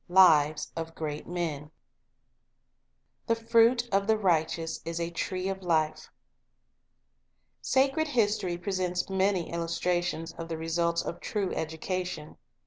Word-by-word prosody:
Lives 155 -5 +5
of 165 0 -5
Great 150 -1 -4
Me 175 0 -1
11 150 +2 -14 1.6
'THE 230 - +3
FRUIT 230 +1 +3
OF 200 0 +2
THE 220 0 +4
RICH 170 -6 +2
I - - -2
KOI 165 - -5
s 160 - -4
IS 165 0 -4
A 170 0 -2
TREE 185 +2 -2
OF 190 0 -4
LIFE" 155 -3 0 1.7
O - - +7
ACRED 275 +4 +2
history 210 -9 +1
presents 180 0 -2
many 190 -2 +1
illustrations 170 0 -1
of 165 0 -5
the 165 - -2
^ - - -6
results 170 +1 0
of 170 - -5
true 200 -3 -2
education. 160 0 -4
175 Hz, 145 wpm, -29 LUFS, 165-195 Hz, 1.7 s, O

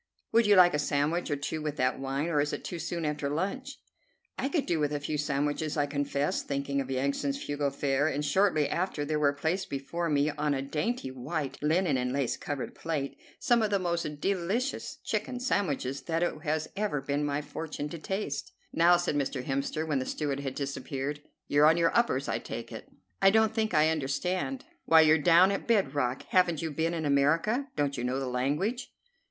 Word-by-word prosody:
"Would 230 -1 +4
you 205 - +6
like 180 -1 +7
a 150 - +1
sandwich 150 +4 0
or 145 - +1
two 145 +2 -4
with 150 -1 -3
that 130 -2 0
wine, 135 +2 -2
or 150 -3 +2
is 145 - -1
it - - -4
too 175 - -5
soon 170 0 -3
after 150 -1 -1
lunch?" 230 - -3 0.6
"I 270 - -2
could 290 -1 0
do 170 -2 0
with 145 -1 +1
a 145 - -1
few 150 +1 -3
sandwiches," 145 +1 -1
I 145 - +3
confessed, 145 0 -1
thinking 140 0 -1
of 135 - -6
Yansan's 140 - -1
frugal 145 -1 -1
fare; 140 +1 0
and 150 -1 -1
shortly 155 -1 +3
after 170 -4 -2
there 155 +1 -1
were 145 -1 +4
placed 165 +7 -2
before 165 +5 -3
me, 145 0 +2
on 150 0 0
a 135 - -2
dainty, 150 - -2
white, 130 +2 -4
linen 155 -1 +2
and 125 0 -1
lace 135 -2 0
covered 145 -3 -5
plate, 150 -4 -3 0.2
some 240 -2 +3
of 215 - +1
the 200 - +2
most 170 -5 -2
delicious 200 - -1
chicken 250 -1 -2
sandwiches 145 - -1
that 165 +3 -1
it 155 -3 -2
has 155 0 -1
ever 200 -7 -1
been 140 +2 -1
my 145 0 0
fortune 150 0 -5
to 170 - -7
taste. 190 -5 -4 0.2
"Now," 175 +2 +5
said 175 -2 -1
Mr. 135 -2 -1
Hemster, 140 +4 -2
when 145 -3 +1
the 130 - -4
steward 145 -3 -2
had 135 -2 -4
disappeared, 140 +1 -4 0.3
"you're 145 +1 +5
on 165 +2 +5
your 170 -1 +2
uppers, 235 +1 +2
I - - -1
take - - -7
it." - - -9 0.3
"I 195 - +7
don't 220 +1 +3
think 220 -3 0
I 155 +1 +5
understand." 180 - -2 0.2
"Why, 160 -1 +7
you're 155 0 +5
down 175 +5 +6
at 195 - -3
bed 200 -11 +2
rock. 130 -3 -1
Haven't 175 -4 +2
you 160 - -2
been 165 +3 -1
in 160 -2 -2
America? 165 - +2
Don't 140 -2 0
you - - -3
know 125 +2 -1
the 135 - -2
language?" 145 - -1
150 Hz, 205 wpm, -29 LUFS, 140-175 Hz, 0.6 s, like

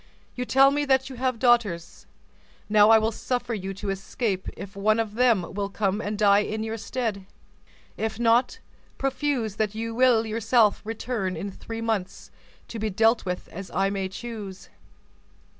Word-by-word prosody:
You 250 - -4
tell 270 +2 +5
me 290 +1 0
that 265 -1 +2
you - - -7
have 255 -1 0
daughters; 225 -9 +1 0.6
now 210 0 +5
I 225 - +8
will 220 +1 +1
suffer 245 +1 -3
you 195 -3 -4
to 200 0 -3
escape, 195 0 -3
if 195 0 -9
one 215 +3 +2
of 220 -2 -2
them 230 -6 +2
will 200 0 -2
come 200 0 -1
and 210 0 -3
die 200 -1 +5
in 215 +1 -2
your 225 0 -4
stead. 220 -4 -3 0.7
If 220 0 -3
not, 235 +1 +3 0.4
profuse 270 -6 -1
that 215 -1 -1
you 225 +1 -3
will 240 -2 +4
yourself 225 0 +2
return 220 -4 -3
in 200 +4 -4
three 225 +4 -7
months, 215 -5 -3 0.4
to 230 - -6
be 215 0 -1
dealt 225 +4 +2
with 180 -1 -4
as 190 +2 -8
I 195 0 0
may 195 -1 -2
choose." 205 -2 -8
220 Hz, 170 wpm, -25 LUFS, 200-235 Hz, 0.7 s, I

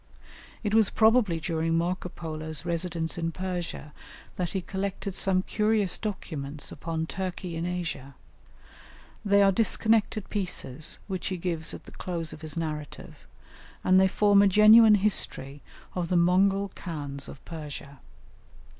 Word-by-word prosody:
It 210 -1 -1
was 220 -3 +4
probably 220 -6 +3
during 165 0 -1
Marco 180 +2 -1
Polo's 155 -2 -4
residence 170 -1 -1
in 165 0 -1
Persia 175 -4 -5 0.4
that 180 -2 -2
he 190 - -3
collected 195 +1 -4
some 185 0 +1
curious 210 -3 +1
documents 155 -9 -5
upon 160 +1 -3
Turkey 180 -1 -5
in 165 +1 -2
Asia; 165 -7 -5 1.1
they 200 -1 +4
are 195 - +5
disconnected 220 0 +1
pieces, 180 -7 -2
which 190 -3 -4
he 185 - -2
gives 165 -2 -2
at - - -11
the - - -12
close 170 -3 -5
of 155 - -11
his 155 +1 -6
narrative, 150 -3 -6 0.6
and 185 0 +5
they 190 - +5
form 205 +1 +4
a 200 - +5
genuine 215 +2 +8
history 145 -9 0 0.3
of 175 -2 -3
the 180 - +2
Mongol 195 +3 +3
Khans 145 -5 -6
of - - -9
Persia. 145 -4 -8
180 Hz, 140 wpm, -27 LUFS, 160-200 Hz, 1.1 s, genuine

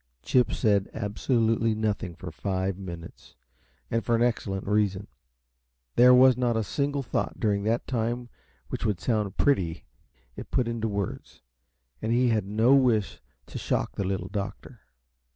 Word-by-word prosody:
Chip 125 -2 +3
said 100 -2 +1
absolutely 115 +1 +1
nothing 105 -5 -2
for 90 0 -8
five 95 +2 -2
minutes, 85 -3 -10 0.6
and 115 0 0
for 120 - +1
an 115 - +2
excellent 100 -5 -1
reason. 100 -2 +1 0.9
There 125 +1 +7
was 130 0 +7
not 120 -2 0
a 110 - +1
single 140 +4 -1
thought - - -3
during 100 -2 0
that 115 +2 0
time 120 0 -2 0.4
which - - -4
would 105 -5 0
sound 105 -5 -1
pretty 90 -12 +1 0.5
if - - -8
put 125 - +1
into 115 -1 -2
words, 100 - -5 0.6
and 115 - -1
he 125 +1 +3
had 110 -4 0
no 110 +5 +3
wish 120 -8 +2 0.2
to - - -7
shock - - -1
the - - -1
Little 95 -1 -3
Doctor. 105 +4 -6
110 Hz, 150 wpm, -27 LUFS, 100-120 Hz, 0.9 s, There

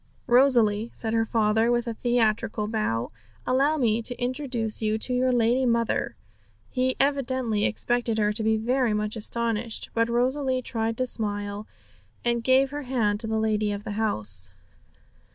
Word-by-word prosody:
'Rosalie,' 240 -4 +4
said 225 -1 -3
her 225 0 +2
father, 225 +1 +2
with 240 0 +1
a 235 - -3
theatrical 220 -2 0
bow, 130 - -1 0.3
'allow 280 +5 +2
me 230 -4 +1
to 245 +2 -4
introduce 245 -4 -2
you 215 0 +1
to 250 +3 -1
your 255 +1 +2
lady 240 +2 +2
mother!' 235 -2 0 0.6
He 255 0 0
evidently 260 -6 +1
expected 240 0 0
her 210 -1 +2
to 220 - -1
be 220 0 +2
very 240 0 +1
much 210 +1 -2
astonished, 230 0 -2
but 230 0 +1
Rosalie 255 +2 0
tried 225 -1 -2
to 255 - +1
smile, 205 -3 -2 0.6
and 235 -1 +1
gave 265 +2 +3
her 290 0 -4
hand 230 -6 0
to 225 - -4
the 220 0 -1
lady 215 -1 +1
of 205 0 -4
the 210 - -5
house. 105 - -2
230 Hz, 160 wpm, -26 LUFS, 215-250 Hz, 0.6 s, Rosalie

